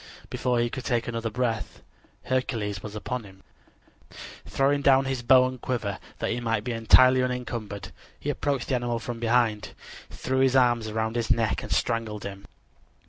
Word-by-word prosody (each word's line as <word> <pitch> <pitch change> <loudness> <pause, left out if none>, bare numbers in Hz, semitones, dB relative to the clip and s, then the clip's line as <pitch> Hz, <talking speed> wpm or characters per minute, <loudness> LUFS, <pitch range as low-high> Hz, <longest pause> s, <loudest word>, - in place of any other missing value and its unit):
Before 125 -1 0
he 120 0 0
could 130 - -5
take 120 -1 0
another 115 -1 -2
breath, 115 -1 -3 0.4
Hercules 115 -6 -2
was 105 0 -8
upon 125 +3 -4
him. 95 -1 -15 1.0
Throwing 140 +1 +1
down 135 -1 +5
his 135 -2 -2
bow 130 +1 +6
and 130 -1 -5
quiver, 110 -6 -2 0.2
that - - -2
he 120 - -1
might 115 -3 -1
be 125 - -3
entirely 130 +3 +6
unencumbered, 120 -5 -4 0.3
he 145 - -1
approached 140 -2 -2
the - - 0
animal 120 -1 -1
from 120 0 -6
behind, 115 -2 +1 0.3
threw 130 0 -2
his 135 0 +3
arm 120 -2 +4
around 110 +1 -2
his 120 -2 -1
neck 115 -2 +1
and - - -8
strangled 110 -3 -1
him. 100 0 -8
120 Hz, 170 wpm, -26 LUFS, 110-130 Hz, 1.0 s, bow